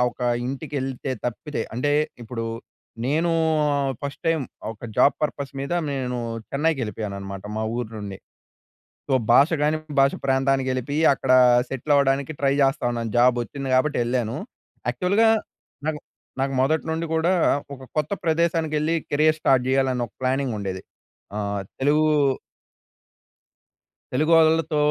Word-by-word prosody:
ఒక 125 - -9 0.2
ఇంటికి 140 +3 -5
ఎళ్తే 130 0 -4
తప్పితే, 125 +3 -3
అంటే 145 +4 0 0.3
ఇప్పుడు 115 0 -5 0.6
నేను 160 +5 +1 0.5
ఆహ్, 140 -1 0
ఫస్ట్ 140 0 -5
టైమ్ 165 -3 +2 0.3
ఒక 115 - -13
జాబ్ 140 - +5
పర్పస్ 140 -2 -2
మీద 140 +5 -4 0.2
నేను 125 -2 -2 0.3
చెన్నైకెళ్ళిపోయానన్నమాట 105 -10 -2
మా 110 - -1
ఊరు 120 -2 -3
నుండి. 100 -2 -6 0.9
సో, - - -1 0.2
భాషగాని 150 +3 +4 0.2
భాష 135 0 +4
ప్రాంతానికి 135 0 +2
ఎళ్ళిపోయి 135 +4 -2
అక్కడ 130 -1 0 0.4
సెటిల్ 135 +3 -2
అవ్వడానికి 140 +1 +2
ట్రై 135 -1 +3
జేస్తా 135 -1 +2
ఉన్నాను. 115 -2 -3
జాబ్ 125 0 +5
వచ్చింది 135 +3 -6
కాబట్టి 140 +3 +2
ఎళ్ళాను. 120 -2 -1 0.5
యాక్చువల్‌గా 185 - +3 0.6
నాకు, 155 -1 -1 0.4
నాకు 135 0 0
మొదటి 155 +4 +2
నుండి 165 +1 -2
కూడా 165 +3 +2 0.4
ఒక 130 - -14 0.2
కొత్త 150 +5 -1
ప్రదేశానికి 165 -1 +1
ఎళ్లి 160 +2 +1 0.2
కెరియర్ 155 +2 +3
స్టార్ట్ 130 -3 +3
చేయాలి 135 0 +2
అన్న 120 -1 -1
ఒక - - -38
ప్లానింగ్ 130 -2 0
ఉండేది. 95 -2 -4 0.6
ఆహ్, 100 -1 -2 0.2
తెలుగు 145 +3 +3 2.2
తెలుగోళ్లతో 160 +2 +3
135 Hz, 130 wpm, -24 LUFS, 125-155 Hz, 2.2 s, జాబ్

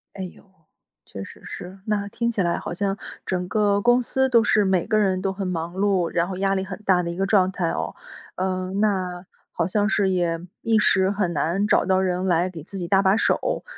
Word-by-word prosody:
哎 190 - -5
哟， 180 - -10 0.6
确 95 - -8
实 - - -12
是。 185 +2 -8
那 205 -2 -1
听 235 +3 -1
起 205 - -1
来 170 -1 +1
好 - - -5
像 195 +2 -1 0.3
整 180 -1 -2
个 205 -1 +2
公 240 +2 +4
司 265 +2 +1
都 235 -3 +4
是 210 -3 +3
每 190 -2 +2
个 215 - +2
人 190 -3 +2
都 195 - 0
很 195 -1 -4
忙 170 0 -3
碌， 190 -3 +1
然 170 0 +1
后 190 -1 -5
压 195 0 +1
力 190 - -1
很 195 +2 -7
大 180 -2 +3
的 170 - -3
一 - - -6
个 195 +1 0
状 190 -2 +3
态 175 -3 -1
哦。 - - -3 0.4
嗯， 185 +1 -2
那， 185 -4 0 0.3
好 170 0 -1
像 205 +2 +1
是 205 -3 +2
也 170 -3 0 0.2
一 225 -1 +2
时 190 -1 +3
很 195 -4 0
难 170 +7 0
找 - - +3
到 190 0 +3
人 185 0 0
来 175 0 +2
给 165 -4 -9
自 195 +3 -8
己 175 -2 -4
搭 195 +1 +4
把 190 +2 +4
手， - - 0
190 Hz, 245 characters per minute, -23 LUFS, 180-205 Hz, 0.6 s, 公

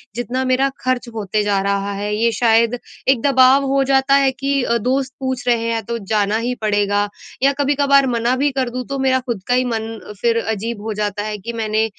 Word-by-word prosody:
जितना 245 +2 -2
मेरा 255 +2 +2
खर्च 255 -1 -1
होते 210 0 -1
जा 205 -1 +1
रहा 200 0 -1
है। 205 +1 -3
ये 230 +2 +2
शायद 230 +1 +2 0.3
एक 260 -4 +3
दबाव 265 0 +5
हो 275 0 +3
जाता 270 +1 +3
है 275 -1 +4
कि 275 +1 -1
अ, 235 -1 +1
दोस्त 255 +3 -1
पूछ 260 -1 -3
रहे 230 -1 +1
हैं 225 - -2
तो 235 +2 -3 0.2
जाना 210 0 +2
ही 250 - 0
पड़ेगा 205 -1 +1 0.4
या 275 +1 +4
कभी-कभार 280 -1 +3
मना 240 0 +1
भी 280 +2 +1
कर 260 -2 -1
दूँ, 250 +1 -5
तो 275 0 -4
मेरा 260 -1 +2
ख़ुद 235 -7 -5
का 245 - +2
ही 255 0 +2
मन 225 -1 -3 0.2
फिर 230 -1 +2
अजीब 220 0 -3
हो 220 0 -3
जाता 205 0 -2
है 210 -1 -4
कि, 235 +4 -7
मैंने 220 -1 0
240 Hz, 215 wpm, -19 LUFS, 215-265 Hz, 0.4 s, दबाव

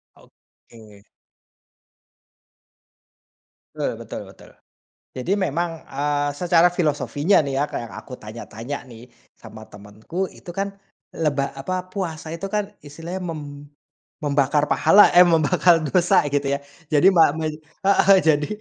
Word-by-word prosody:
Oke. 105 -3 -20 2.7
Betul - - -1
betul - - -7
betul. - - -17 0.7
Jadi 130 +9 -2
memang, 170 -2 -2
eee, 145 +1 -1
secara 175 +1 +4
filosofinya 160 0 +1
nih 140 -3 -3
ya, 140 - +2
Kak, - - -3
yang - - -12
aku - - -11
tanya-tanya 115 +4 -7
nih, 120 -1 -14 0.2
sama 110 0 -13
temenku, 110 - -6
itu - - -12
kan 195 +2 -4 0.4
leba 145 -4 0
apa, 185 +6 -4
puasa 170 -5 -5
itu 170 - -8
kan 210 -1 0 0.2
istilahnya 165 +6 -7
mem 160 -2 -6 0.8
membakar 145 0 +2
pahala, 205 +1 +6
eh 175 - +8
membakar 165 0 +4
dosa 175 +4 +3
gitu 145 -1 0
ya. - - -5 0.3
Jadi 150 +5 +5
ma 165 -3 +6
mu 160 - -3 0.4
heeh, 195 0 +5
jadi 150 -2 +2
155 Hz, 125 wpm, -22 LUFS, 140-175 Hz, 2.7 s, eh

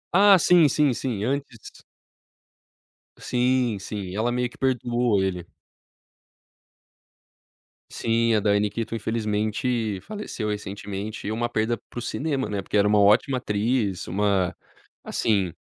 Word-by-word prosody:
Ah, 200 0 +7
sim, 170 -2 +5
sim, 145 -1 +2
sim, 115 -5 -3
antes 135 -3 -5 1.3
Sim, 125 -2 +1
sim. 100 -2 -6
Ela 115 +3 0
meio 125 0 -1
que - - -18
perdoou 120 -5 +1
ele. 90 -3 -2 2.5
Sim, 115 0 +1
a - - +3
Diane 105 0 +2
Keaton, 115 +2 -4
infelizmente, 110 0 -1
faleceu 205 - -5
recentemente. 100 +1 -5
Uma 120 +2 -1
perda 115 +1 0
para 120 +2 -10
o - - -5
cinema, 135 +1 -2
né, 100 -1 -2
porque 100 - -2
era 105 0 +4
uma 105 0 +4
ótima 110 +6 +4
atriz, 105 -3 -1
uma 95 -1 0 0.5
assim, 95 -6 0
110 Hz, 120 wpm, -24 LUFS, 105-125 Hz, 2.5 s, Ah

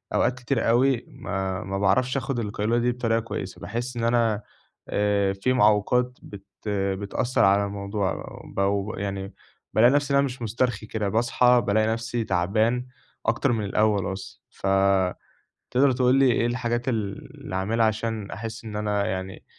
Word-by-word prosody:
أوقات 125 0 +1
كتير 125 -2 0
أوي 125 +1 +3
ما 95 -1 -3
ما 95 0 -3
باعرفش 130 +6 +2
أخد 130 -1 -2
القيلولة 105 +2 -1
دي 125 +1 +2
بطريقة 115 -2 0
كويسة، 100 -4 -6
باحس 120 +3 -4
إن 115 - -2
أنا 115 -3 +2 0.5
آآ، 100 -1 +1
في 100 +7 0
معوّقات 125 +3 +2
بت 100 -1 -11 0.2
بتأثّر 100 +4 0
على 100 +1 +4
الموضوع 100 -1 -3 0.3
بو 100 +1 +1
ب - - -8
يعني 100 -1 -4 0.4
بالاقي 120 +3 +6
نفسي 145 -1 +1
إن - - +5
أنا 140 - +3
مش 125 -2 -6
مُسترخي 115 -1 -1
كده، 105 -2 -2
باصحى 120 +2 +3
بالاقي 110 +2 +3
نفسي 115 +1 -1
تعبان 110 +7 +1 0.4
أكتر 120 +3 +2
من 110 -3 -1
الأول 100 -1 +1
أصلًا، 95 0 -9
ف 95 - -5 1.0
تقدر 130 +1 +4
تقول 125 0 +3
لي 135 -2 +5
إيه 115 - +1
الحاجات 120 +1 -1
ال 105 -5 -3
اللي - - -6
أعملها 110 +4 +1
عشان 110 -1 -2
أحس 115 +3 -6
إن 105 -2 -6
أنا 105 -1 0
يعني 95 0 -5
110 Hz, 160 wpm, -25 LUFS, 100-120 Hz, 1.0 s, بالاقي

